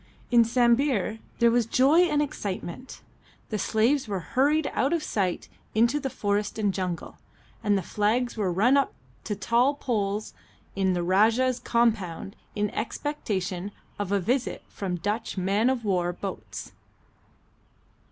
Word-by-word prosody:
In 235 -1 +7
Sambir 235 -2 +2 0.2
there 235 -1 +4
was 235 -1 +2
joy 270 +7 +4
and 300 -3 +2
excitement. 205 -1 -6 0.5
The 215 - -2
slaves 235 +7 +2
were 200 -3 -2
hurried 295 +4 +3
out 275 +5 +1
of 335 -2 0
sight 185 -4 -1 0.3
into 235 +6 +3
the 270 - -3
forest 205 -2 -1
and 205 -3 +1
jungle, 180 -3 -4 0.4
and 205 -2 +3
the 190 - -2
flags 225 +7 0
were 205 -5 0
run 230 +10 +4
up 275 - +1 0.3
to 210 - -2
tall 240 +7 +2
poles 210 -6 -2 0.4
in 190 -1 +2
the 175 -1 -1
Rajah's 225 +7 +3
compound 215 -5 0 0.2
in 210 -1 0
expectation 205 -7 -3 0.3
of 200 -2 -2
a 200 - +3
visit 245 +7 -1
from 190 -3 -3
Dutch 205 +5 -3
man 200 +6 +2
of 250 -4 -1
war 180 -3 +1
boats. 195 +2 -7
220 Hz, 140 wpm, -26 LUFS, 195-250 Hz, 0.5 s, In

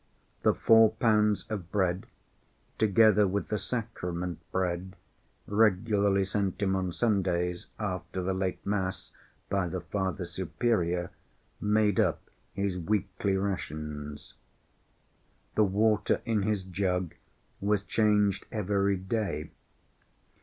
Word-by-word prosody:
The - - +3
four 115 -1 +6
pounds 105 -3 +2
of 95 -5 -5
bread, 95 -2 0 0.7
together 105 -1 +5
with 100 +2 -2
the 105 - 0
sacrament 90 -8 -4
bread, 95 0 -2 0.5
regularly 100 -1 +3
sent 100 -1 -1
him 95 -2 +1
on 95 -1 -1
Sundays 90 -5 0
after 95 -2 -3
the 95 +1 0
late 95 -1 -2
mass 95 -2 -2 0.4
by 100 -2 0
the 90 +2 -3
Father 95 +1 -3
Superior, 90 -7 -1 0.5
made 105 -1 +2
up - - 0 0.2
his 100 -2 -1
weekly 100 +1 0
rations. 75 -6 -4 1.2
The 105 - +4
water 105 +1 +2
in 110 -3 +1
his 105 -1 0
jug 90 -2 -1 0.5
was 100 0 +1
changed 105 -2 +2
every 100 -2 +1
day. 95 -6 -3
100 Hz, 110 wpm, -29 LUFS, 90-105 Hz, 1.2 s, four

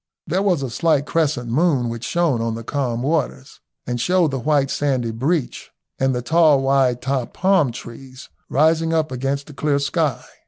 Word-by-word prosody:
There 180 +4 0
was 180 -8 +1
a 130 - -4
slight 155 0 +1
crescent 145 -7 -1
moon, 140 -3 +2
which 115 0 -5
shone 160 -5 0
on 115 -1 -2
the 115 - -7
calm 125 -2 -2
waters 135 - -2 0.3
and 120 -1 -3
showed 175 +2 +2
the 135 - -2
white 140 0 +1
sandy 130 -5 -1
breach 135 +5 -2 0.3
and 135 -1 +1
the 125 - -3
tall 155 -1 +4
wide 135 -2 +2
topped 130 -2 -2
palm 185 -8 +2
trees 130 +2 -11 0.2
rising 160 +3 +2
up 155 -2 0
against 135 +2 -2
the 150 - -12
clear 145 0 0
sky. 140 -1 -1
140 Hz, 180 wpm, -21 LUFS, 125-160 Hz, 0.3 s, tall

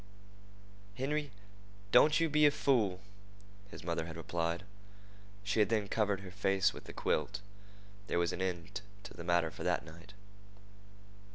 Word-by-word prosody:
"Henry, 145 +4 -1 0.6
don't 155 +1 +6
you 165 - +3
be 150 0 +5
a - - +7
fool," 110 -10 +1 0.7
his - - -10
mother 85 -1 -2
had 80 -1 -7
replied. 85 +2 -2 0.8
She 100 +1 0
had 105 - +4
then 110 -3 +1
covered 105 -2 +1
her 95 -2 -9
face 95 0 +2
with - - -10
the - - -8
quilt. 100 +6 -1 0.7
There - - 0
was 85 0 +1
an 90 - -4
end 90 0 -3 0.2
to 95 - -9
the 85 - -8
matter 85 -2 +2
for - - -11
that - - 0
night. 85 +4 -13
95 Hz, 155 wpm, -34 LUFS, 85-110 Hz, 0.8 s, a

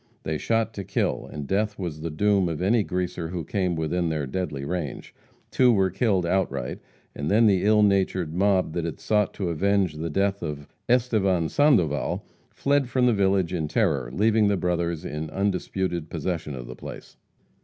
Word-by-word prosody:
They 80 -1 -2
shot 115 -1 0
to 100 - -5
kill, 95 +1 -1
and 75 -2 -5
death 105 +6 0
was 85 -5 -5
the 85 - -3
doom 100 +2 +2
of 80 - -3
any 105 +6 +3
greaser 90 -3 -3
who 85 0 -4
came 90 +1 -1
within 80 +2 -1
their 75 -3 -1
deadly 70 -1 -3
range. 85 -2 -4 0.4
Two 125 -1 +5
were 95 -4 +2
killed 95 -2 +1
outright, 90 -8 -1 0.4
and 70 +1 -3
then 110 +3 +5
the 95 -4 +3
ill 105 +1 +5
natured 95 -5 +1
mob 95 -2 +2
that 85 - -2
had 85 -1 -4
sought 105 -2 +1
to 95 -4 -2
avenge 95 +1 +1
the 80 +2 -4
death 100 +4 0
of 75 -3 -5 0.2
Estevan 105 -9 +2
Sandoval, 95 - +2 0.2
fled 140 -2 +1
from 125 0 +2
the 120 - +4
village 95 -3 +1
in 80 -4 -1
terror, 75 - 0
leaving 105 - +3
the 100 -1 +2
brothers 85 -1 -1
in 75 +1 -4
undisputed 95 -4 -2
possession 80 -3 -3
of 60 -1 -7
the - - -8
place. - - -10
90 Hz, 180 wpm, -25 LUFS, 80-100 Hz, 0.4 s, Two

